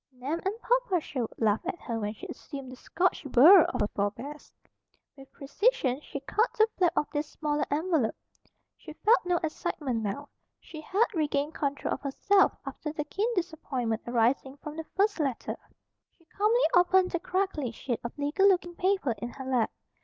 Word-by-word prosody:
Nan 270 Hz, +6 st, -4 dB
and 385 Hz, +2 st, -1 dB
Papa -, -, +2 dB
Sherwood 255 Hz, -7 st, -4 dB
laughed 215 Hz, -2 st, +1 dB
at 345 Hz, -, -3 dB
her 230 Hz, -2 st, -3 dB
when 210 Hz, 0 st, -3 dB
she -, -, -10 dB
assumed 275 Hz, -4 st, -8 dB
the -, -, -9 dB
Scotch 360 Hz, +8 st, -1 dB
burr 310 Hz, +8 st, +8 dB
of -, -, -2 dB
her 210 Hz, -, +2 dB
forebears. 240 Hz, +9 st, -4 dB, 0.6 s
With 270 Hz, -1 st, -15 dB
precision 280 Hz, -, 0 dB
she 280 Hz, -, -7 dB
cut 435 Hz, -, +1 dB
the 435 Hz, 0 st, +5 dB
flap 355 Hz, -3 st, +2 dB
of 300 Hz, -, +2 dB
this 295 Hz, 0 st, -2 dB
smaller 300 Hz, -1 st, -1 dB
envelope. 305 Hz, -5 st, +1 dB, 0.6 s
She 310 Hz, -, -11 dB
felt 430 Hz, +6 st, +3 dB
no 355 Hz, -1 st, +2 dB
excitement 290 Hz, -6 st, -2 dB
now. 220 Hz, +8 st, -4 dB, 0.3 s
She 310 Hz, -, -10 dB
had 395 Hz, +8 st, +2 dB
regained 295 Hz, -2 st, 0 dB
control 285 Hz, -3 st, -2 dB
of -, -, -5 dB
herself 385 Hz, +8 st, +3 dB
after 300 Hz, -, -5 dB
the 300 Hz, -1 st, -3 dB
keen 410 Hz, +10 st, -1 dB
disappointment 265 Hz, -10 st, -2 dB
arising 250 Hz, +3 st, +1 dB
from 300 Hz, +1 st, -8 dB
the 320 Hz, 0 st, -5 dB
first 405 Hz, -1 st, +2 dB
letter. 270 Hz, -6 st, -2 dB, 0.6 s
She 335 Hz, -, -28 dB
calmly 430 Hz, +8 st, +2 dB
opened 365 Hz, +1 st, +4 dB
the 345 Hz, -, -1 dB
crackly 370 Hz, -7 st, -1 dB
sheet 240 Hz, +1 st, -4 dB
of 235 Hz, -, -6 dB
legal 295 Hz, +8 st, +2 dB
looking 355 Hz, -2 st, +2 dB
paper 370 Hz, -6 st, +1 dB
in 240 Hz, -, -4 dB
her 265 Hz, +2 st, -9 dB
lap. 250 Hz, -4 st, +1 dB
300 Hz, 175 wpm, -28 LUFS, 260-365 Hz, 0.6 s, burr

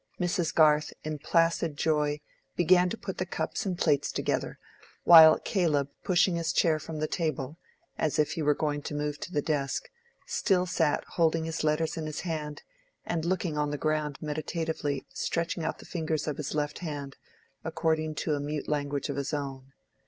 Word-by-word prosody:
Mrs. 175 Hz, -2 st, 0 dB
Garth, 150 Hz, -1 st, +4 dB
in 155 Hz, -1 st, -4 dB
placid 165 Hz, -1 st, +1 dB
joy, 150 Hz, -1 st, +1 dB, 0.3 s
began 180 Hz, +1 st, +4 dB
to 225 Hz, -, -4 dB
put 190 Hz, -4 st, -6 dB
the 185 Hz, -, 0 dB
cups 195 Hz, -, -3 dB
and 180 Hz, -2 st, -1 dB
plates 145 Hz, -5 st, +2 dB
together, -, -, -2 dB, 0.5 s
while 160 Hz, -2 st, +10 dB
Caleb 150 Hz, -8 st, 0 dB
pushing 180 Hz, -1 st, +3 dB
his 165 Hz, -1 st, 0 dB
chair 160 Hz, -2 st, +3 dB
from 155 Hz, +1 st, -7 dB
the 155 Hz, 0 st, -1 dB
table, 155 Hz, -2 st, -2 dB, 0.4 s
as 155 Hz, -, 0 dB
if 150 Hz, -, +2 dB
he 165 Hz, -, -3 dB
were 150 Hz, -1 st, +3 dB
going 145 Hz, -1 st, -1 dB
to 150 Hz, -, -5 dB
move 150 Hz, 0 st, -2 dB
to -, -, -7 dB
the 145 Hz, -5 st, 0 dB
desk, 140 Hz, -3 st, -2 dB, 0.3 s
still 185 Hz, -4 st, +1 dB
sat 160 Hz, -4 st, +1 dB
holding 165 Hz, -1 st, +1 dB
his 165 Hz, -1 st, -3 dB
letters 155 Hz, +1 st, +1 dB
in 155 Hz, -1 st, -3 dB
his 155 Hz, -, -4 dB
hand 155 Hz, -3 st, -4 dB, 0.4 s
and 165 Hz, -2 st, -2 dB
looking 170 Hz, -4 st, -1 dB
on 150 Hz, 0 st, +1 dB
the 145 Hz, -, -2 dB
ground 150 Hz, 0 st, -1 dB
meditatively, 155 Hz, -2 st, -2 dB
stretching 170 Hz, 0 st, -2 dB
out 160 Hz, -, -2 dB
the -, -, -13 dB
fingers 160 Hz, -3 st, -2 dB
of 150 Hz, -, -2 dB
his 150 Hz, 0 st, -4 dB
left 150 Hz, -1 st, -1 dB
hand, 145 Hz, -5 st, -5 dB, 0.5 s
according 160 Hz, -1 st, 0 dB
to 155 Hz, +2 st, -1 dB
a 145 Hz, -, 0 dB
mute 145 Hz, +1 st, -3 dB
language 145 Hz, -2 st, -1 dB
of 140 Hz, -2 st, -4 dB
his 140 Hz, +1 st, -2 dB
own. 135 Hz, -2 st, -6 dB
155 Hz, 180 wpm, -29 LUFS, 145-165 Hz, 0.5 s, while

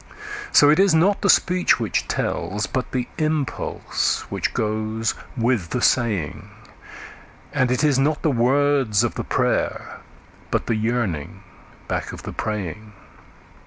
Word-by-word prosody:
So 145 Hz, 0 st, +7 dB
it 155 Hz, -, +3 dB
is 195 Hz, -4 st, +5 dB
not 190 Hz, +5 st, +3 dB
the 200 Hz, -, +1 dB
speech 180 Hz, 0 st, +4 dB
which -, -, -1 dB
tells, 105 Hz, +1 st, -2 dB
but 130 Hz, +6 st, -3 dB
the 125 Hz, -2 st, -2 dB
impulse 155 Hz, -3 st, -1 dB
which -, -, -1 dB
goes 110 Hz, +1 st, -1 dB, 0.2 s
with 115 Hz, -7 st, 0 dB
the 125 Hz, -, -1 dB
saying; 110 Hz, -, 0 dB, 1.0 s
And 130 Hz, -4 st, +2 dB
it 125 Hz, +4 st, 0 dB
is 145 Hz, -3 st, +3 dB
not 150 Hz, +3 st, +1 dB
the 155 Hz, -, +3 dB
words 130 Hz, -3 st, +2 dB
of 120 Hz, -, 0 dB
the -, -, -4 dB
prayer, -, -, -1 dB, 0.5 s
but -, -, 0 dB
the 115 Hz, -, 0 dB
yearning 110 Hz, -9 st, -2 dB, 0.4 s
back -, -, -3 dB
of -, -, -9 dB
the -, -, -6 dB
praying. 105 Hz, +1 st, -4 dB
125 Hz, 140 wpm, -22 LUFS, 110-145 Hz, 1.0 s, So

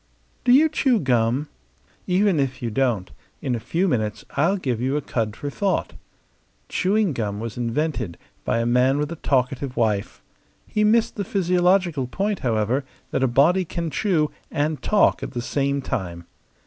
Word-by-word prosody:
Do 245 Hz, -, +3 dB
you 290 Hz, +5 st, +7 dB
chew 270 Hz, -6 st, +2 dB
gum? 125 Hz, -, +1 dB, 0.6 s
Even 185 Hz, -2 st, +3 dB
if 135 Hz, -1 st, -1 dB
you 115 Hz, -, -2 dB
don't, 110 Hz, -, 0 dB, 0.3 s
in 130 Hz, -, -2 dB
a 120 Hz, -, -1 dB
few 165 Hz, -, 0 dB
minutes 110 Hz, -, -1 dB
I'll 170 Hz, +8 st, +2 dB
give 125 Hz, -, -2 dB
you 135 Hz, +3 st, 0 dB
a -, -, -1 dB
cud 110 Hz, -5 st, -2 dB
for 145 Hz, +3 st, -5 dB
thought. 195 Hz, +5 st, -1 dB, 0.8 s
Chewing 200 Hz, -2 st, +1 dB
gum 105 Hz, -4 st, -3 dB
was 115 Hz, 0 st, -5 dB
invented 120 Hz, -, -2 dB, 0.3 s
by -, -, 0 dB
a 115 Hz, -, 0 dB
man 125 Hz, +3 st, +3 dB
with 150 Hz, +2 st, -1 dB
a -, -, -3 dB
talkative 130 Hz, -1 st, -1 dB
wife. 105 Hz, -4 st, -1 dB, 0.4 s
He 210 Hz, -, 0 dB
missed 220 Hz, +2 st, +3 dB
the 200 Hz, -, -1 dB
physiological 180 Hz, -6 st, +2 dB
point, 200 Hz, +8 st, -1 dB
however, 115 Hz, +3 st, 0 dB, 0.3 s
that -, -, 0 dB
a 130 Hz, -, +4 dB
body 150 Hz, +10 st, +4 dB
can 170 Hz, -1 st, -4 dB
chew 155 Hz, -2 st, +1 dB, 0.2 s
and 150 Hz, +1 st, -1 dB
talk 210 Hz, -1 st, +3 dB
at -, -, -6 dB
the 120 Hz, -, -3 dB
same 140 Hz, +2 st, -1 dB
time. 85 Hz, -7 st, -4 dB
140 Hz, 170 wpm, -23 LUFS, 120-180 Hz, 0.8 s, you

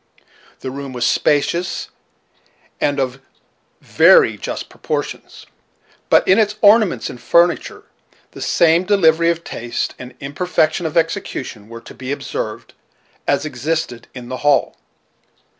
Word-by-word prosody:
The 130 Hz, -, -5 dB
room 140 Hz, 0 st, -7 dB
was 125 Hz, -, -1 dB
spacious, 170 Hz, +4 st, 0 dB, 0.9 s
and 145 Hz, -1 st, 0 dB
of 130 Hz, 0 st, -2 dB, 0.6 s
very -, -, +5 dB
just -, -, -5 dB
proportions; -, -, -5 dB, 0.6 s
but -, -, +4 dB
in 190 Hz, +4 st, +5 dB
its 210 Hz, -1 st, +1 dB
ornaments 205 Hz, -, +4 dB
and 120 Hz, -, -12 dB
furniture 170 Hz, 0 st, +2 dB, 0.5 s
the -, -, -11 dB
same 170 Hz, +1 st, +3 dB
diversity 170 Hz, -4 st, +3 dB
of 170 Hz, 0 st, -1 dB
taste 120 Hz, 0 st, -4 dB
and 125 Hz, 0 st, -10 dB
imperfection 155 Hz, +3 st, 0 dB
of 160 Hz, -, -4 dB
execution 150 Hz, -, -2 dB
were 115 Hz, 0 st, -9 dB
to -, -, -12 dB
be 130 Hz, 0 st, -6 dB
observed 140 Hz, -, -5 dB, 0.5 s
as 145 Hz, -, +1 dB
existed 140 Hz, -3 st, -3 dB
in 125 Hz, -2 st, -8 dB
the 130 Hz, +1 st, -5 dB
hall. 145 Hz, 0 st, +2 dB
150 Hz, 125 wpm, -19 LUFS, 130-170 Hz, 0.9 s, very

